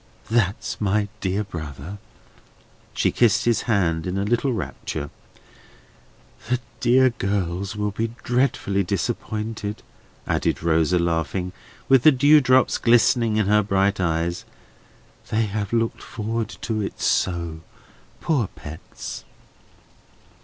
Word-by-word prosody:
"That's 110 -1 0
my 105 0 +1
dear 95 +2 -1
brother!" 80 0 -7 1.0
She - - +2
kissed 120 -4 +3
his 120 -2 +2
hand 85 -6 +1
in 90 +1 -2
a 100 - 0
little 120 +5 +1
rapture. 80 -8 -4 1.4
"The 125 0 +2 0.2
dear 130 +1 +4
girls 100 -1 -2
will 105 0 -1
be 115 +3 -3
dreadfully 120 -6 +1
disappointed," 105 +3 -3 0.4
added - - 0
Rosa, 80 +1 +3
laughing, 85 +1 -1 0.4
with 135 -2 +6
the 155 - +7
dewdrops 130 -1 +4
glistening 115 -1 +3
in 105 - +2
her 105 +2 +4
bright 100 0 +1
eyes. 85 -1 -1 0.9
"They 110 +1 +1
have 105 0 -3
looked 115 -1 0
forward 115 +1 -3
to 110 -2 -2
it 100 - -5
so, 85 -3 0 0.6
poor 140 -10 +1
pets!" 80 -1 -9
105 Hz, 115 wpm, -23 LUFS, 90-115 Hz, 1.4 s, the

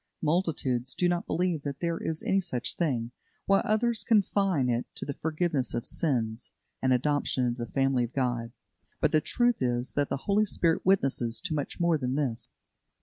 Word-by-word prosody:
Multitudes 150 -7 0
do 180 - +2
not 175 -1 -1
believe 175 -3 0
that 140 -1 -5
there 170 -1 -1
is 160 -1 -3
any 195 0 +2
such 130 -9 -2
thing, 125 -8 -1 0.3
while 195 0 +4
others 225 +2 +1
confine 195 - +2
it 120 0 0
to - - -5
the 140 - -3
forgiveness 155 -4 -1
of 120 - -2
sins 120 -8 -1 0.3
and 130 - +2
adoption 130 0 +1
into 120 0 -2
the 120 - -8
family 135 -2 +2
of 120 - -11
God. 120 -3 -1 0.5
But - - +2
the 155 - +4
truth 240 +7 +1
is 125 0 -1
that 145 -1 0
the - - -1
Holy 210 +1 +3
Spirit 170 -4 +1
witnesses 135 -11 +2
to 180 -4 -3
much 145 +2 -3
more 170 -2 +2
than 130 0 -1
this. 130 -6 -1
145 Hz, 185 wpm, -28 LUFS, 125-175 Hz, 0.5 s, while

